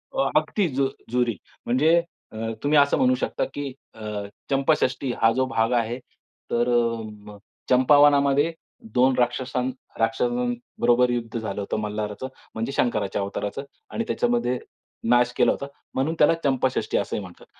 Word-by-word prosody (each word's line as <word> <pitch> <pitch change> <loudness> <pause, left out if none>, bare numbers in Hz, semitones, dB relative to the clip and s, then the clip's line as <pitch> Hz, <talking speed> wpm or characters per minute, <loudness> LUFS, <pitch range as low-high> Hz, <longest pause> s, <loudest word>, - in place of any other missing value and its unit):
हो - - -1 0.2
अगदी 200 -5 -1
जु 135 0 +2 0.2
जुरी. 120 -2 +1 0.3
म्हणजे 150 +7 +4 0.4
अ, 110 - -9 0.3
तुम्ही 150 +1 +3
असं 140 0 +4
म्हणू 130 0 +4
शकता 125 - -2
की 140 -2 -4 0.2
अ, 110 - -12 0.5
चंपाषष्ठी 135 -2 +1
हा 115 0 +6
जो 130 +2 +1
भाग 115 -2 +1
आहे 120 +3 -4 0.5
तर 120 +1 +2 0.4
म 105 -1 -11 0.3
चंपावनामध्ये 145 +3 +5 0.4
2 130 +1 +5
राक्षस 125 +1 0 0.4
राक्षसांबरोबर 120 +1 +1
युद्ध 120 -1 -2
झालं 105 -3 -4
होतं 100 - -3
मल्हाराचं. 105 +2 -4 0.3
म्हणजे 115 +4 -2
शंकराच्या 105 -7 0
अवताराचं 100 +5 -4 0.3
आणि 230 - -2
त्याच्यामध्ये 235 - +1 0.5
नाश 120 0 +4
केला - - +5
होता. - - -3 0.3
म्हणून 145 +5 0
त्याला 150 - +6
चंपाषष्ठी 130 -2 +1
असंही - - -2
म्हणतात. 90 -3 -12
125 Hz, 135 wpm, -24 LUFS, 115-140 Hz, 0.5 s, हा